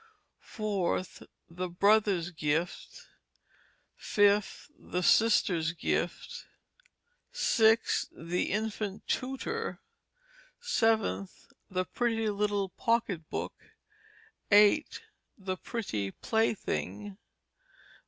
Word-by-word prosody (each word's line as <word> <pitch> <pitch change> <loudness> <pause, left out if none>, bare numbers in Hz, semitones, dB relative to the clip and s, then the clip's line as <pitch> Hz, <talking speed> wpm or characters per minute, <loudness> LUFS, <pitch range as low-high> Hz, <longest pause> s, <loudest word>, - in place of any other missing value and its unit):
4th, 200 -5 -3 0.2
The 180 +2 -5
Brother's 195 -1 +3
Gift. 160 +1 -3 0.9
5th, 205 +5 +2
The 180 - -4
Sister's 175 -6 +3
Gift. 485 - -3 0.9
6th, 225 - +3
The 170 +2 -2
Infant 210 -1 -3
Tutor. 270 - -3 0.8
7th, 225 - 0 0.2
The 185 -1 -1
Pretty 225 0 0
Little 205 -1 0
Pocket 200 -6 -1
Book. - - -3 1.0
8th, 205 0 +5 0.4
The 190 -2 -4
Pretty 110 - -3
Plaything. 105 - -2
200 Hz, 75 wpm, -30 LUFS, 175-225 Hz, 1.0 s, 8th